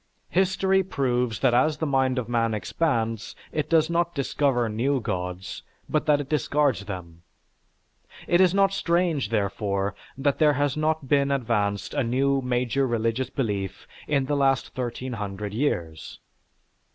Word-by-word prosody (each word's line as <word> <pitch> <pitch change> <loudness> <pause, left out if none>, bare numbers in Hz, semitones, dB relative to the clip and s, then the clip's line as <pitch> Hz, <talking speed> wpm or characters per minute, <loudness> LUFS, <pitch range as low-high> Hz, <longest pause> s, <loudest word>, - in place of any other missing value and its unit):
History 190 +1 +2
proves 125 - -1
that 130 -3 +3
as 145 +5 +3
the 160 - -2
mind 135 -2 +1
of 125 -3 -2
man 115 -2 +1
expands, 115 -3 -1 0.2
it 155 -1 -2
does 160 -2 +4
not 170 0 0
discover 135 -3 +1
new 125 +6 0
gods, 90 -4 -4 0.3
but 155 - 0
that 150 -1 +4
it 145 - -4
discards 140 - +1
them. 85 -4 -8 1.0
It 175 +1 +3
is 185 -2 +5
not 195 0 +3
strange, 170 - +1
therefore, 100 -2 -1 0.2
that 140 0 0
there 150 -2 +5
has 145 0 0
not 155 -2 0
been 140 0 +3
advanced 110 -7 -1
a 145 - +1
new 135 +3 +1
major 125 +1 0
religious 115 +2 -1
belief 100 -7 -3 0.2
in 140 -3 +1
the 145 +2 0
last 135 -2 +1
1300 105 -5 -4
years. 85 - -2
130 Hz, 145 wpm, -25 LUFS, 110-150 Hz, 1.0 s, is